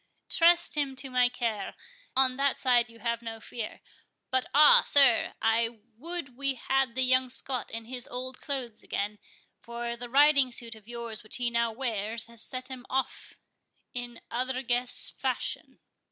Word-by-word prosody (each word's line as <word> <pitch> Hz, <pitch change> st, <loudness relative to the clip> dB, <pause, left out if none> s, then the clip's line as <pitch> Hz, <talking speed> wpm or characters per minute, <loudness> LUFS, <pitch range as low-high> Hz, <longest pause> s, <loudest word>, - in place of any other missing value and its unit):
"Trust 345 Hz, +1 st, +4 dB
him 280 Hz, -3 st, -1 dB
to 265 Hz, 0 st, -5 dB
my 250 Hz, -1 st, +4 dB
care—on 255 Hz, -, 0 dB
that 275 Hz, +1 st, +1 dB
side 240 Hz, -2 st, +2 dB
have 235 Hz, 0 st, -3 dB
no 225 Hz, -1 st, -7 dB
fear. 225 Hz, +1 st, -7 dB, 0.5 s
But 260 Hz, 0 st, +1 dB
ah, 295 Hz, +2 st, +8 dB
sir! 275 Hz, -5 st, +5 dB
I 225 Hz, 0 st, +1 dB
would 305 Hz, 0 st, -6 dB
we 275 Hz, +1 st, -1 dB
had 265 Hz, -1 st, 0 dB
the 260 Hz, -, +1 dB
young 255 Hz, 0 st, +2 dB
Scot 255 Hz, 0 st, -1 dB
in 230 Hz, 0 st, -6 dB
his 250 Hz, +1 st, -3 dB
old 255 Hz, +1 st, -7 dB
clothes 255 Hz, -6 st, -4 dB
again, 205 Hz, +1 st, -4 dB, 0.4 s
for 235 Hz, 0 st, -4 dB
the 240 Hz, 0 st, -8 dB
riding 280 Hz, 0 st, +5 dB
suit 235 Hz, -1 st, -5 dB
of 220 Hz, -1 st, -15 dB
yours 235 Hz, -2 st, -6 dB
which 215 Hz, -, -7 dB
he 245 Hz, -1 st, -1 dB
now 235 Hz, 0 st, +1 dB
wears 225 Hz, -2 st, -2 dB
hath 235 Hz, 0 st, -11 dB
set 255 Hz, +2 st, -2 dB
him 260 Hz, -2 st, -8 dB
off 265 Hz, -1 st, -3 dB, 0.6 s
in 245 Hz, -1 st, -6 dB
other 255 Hz, +2 st, -2 dB
guess 245 Hz, 0 st, +1 dB
fashion." -, -, -4 dB
245 Hz, 160 wpm, -28 LUFS, 235-265 Hz, 0.6 s, ah